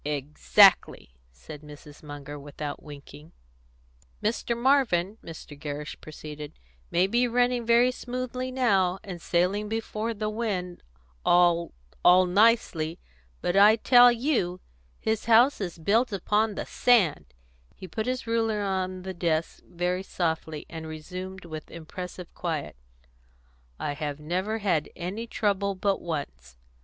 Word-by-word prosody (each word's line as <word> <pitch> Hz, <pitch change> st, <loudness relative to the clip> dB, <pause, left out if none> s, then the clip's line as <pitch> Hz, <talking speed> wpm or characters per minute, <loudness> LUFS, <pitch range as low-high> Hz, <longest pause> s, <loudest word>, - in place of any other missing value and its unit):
"Exactly," 145 Hz, -, +3 dB, 0.2 s
said 60 Hz, -, -11 dB
Mrs. 150 Hz, -1 st, -13 dB
Munger, 145 Hz, -1 st, -8 dB
without 145 Hz, +1 st, -6 dB
winking. 150 Hz, +1 st, -12 dB, 0.9 s
"Mr. 230 Hz, +2 st, -1 dB
Marvin," 235 Hz, -7 st, +2 dB
Mr. 160 Hz, -2 st, -10 dB
Gerrish 145 Hz, +1 st, -6 dB
proceeded, 150 Hz, -1 st, -9 dB, 0.4 s
"may 175 Hz, +2 st, +3 dB
be 240 Hz, +5 st, +2 dB
running 245 Hz, 0 st, +1 dB
very 240 Hz, +2 st, +5 dB
smoothly 255 Hz, 0 st, -4 dB
now, 195 Hz, -8 st, +2 dB
and 180 Hz, -4 st, -8 dB
sailing 190 Hz, +5 st, 0 dB
before 225 Hz, 0 st, -3 dB
the 215 Hz, +1 st, -3 dB
wind 205 Hz, -5 st, -3 dB, 0.4 s
all 175 Hz, -1 st, +3 dB, 0.3 s
all 180 Hz, +1 st, +7 dB
nicely; 180 Hz, -5 st, +2 dB, 0.4 s
but 175 Hz, -, -1 dB
I 205 Hz, +2 st, +7 dB
tell 245 Hz, +2 st, +7 dB
you 235 Hz, -, 0 dB, 0.4 s
his 220 Hz, -1 st, -1 dB
house 235 Hz, +3 st, +5 dB
is 175 Hz, -4 st, -4 dB
built 220 Hz, +9 st, +2 dB
upon 210 Hz, +2 st, 0 dB
the -, -, -4 dB
sand," 180 Hz, -, +2 dB, 0.4 s
He 185 Hz, -, -10 dB
put 215 Hz, +7 st, -4 dB
his 255 Hz, -1 st, -2 dB
ruler 225 Hz, -2 st, 0 dB
by -, -, -1 dB
on 185 Hz, -1 st, -2 dB
the 190 Hz, 0 st, -5 dB
desk 165 Hz, -2 st, -1 dB
very 180 Hz, +1 st, -1 dB
softly, 160 Hz, -4 st, -3 dB
and 160 Hz, -1 st, -8 dB
resumed 185 Hz, +4 st, -7 dB
with 155 Hz, -2 st, -8 dB
impressive 180 Hz, +2 st, -8 dB
quiet: 160 Hz, -, -4 dB, 1.0 s
"I 145 Hz, -, -3 dB, 0.2 s
never 185 Hz, +8 st, -2 dB
had 185 Hz, -8 st, 0 dB
any 200 Hz, +7 st, -5 dB
trouble 200 Hz, -2 st, 0 dB
but 195 Hz, +1 st, 0 dB
once. 65 Hz, -, -6 dB
185 Hz, 130 wpm, -27 LUFS, 160-220 Hz, 1.0 s, all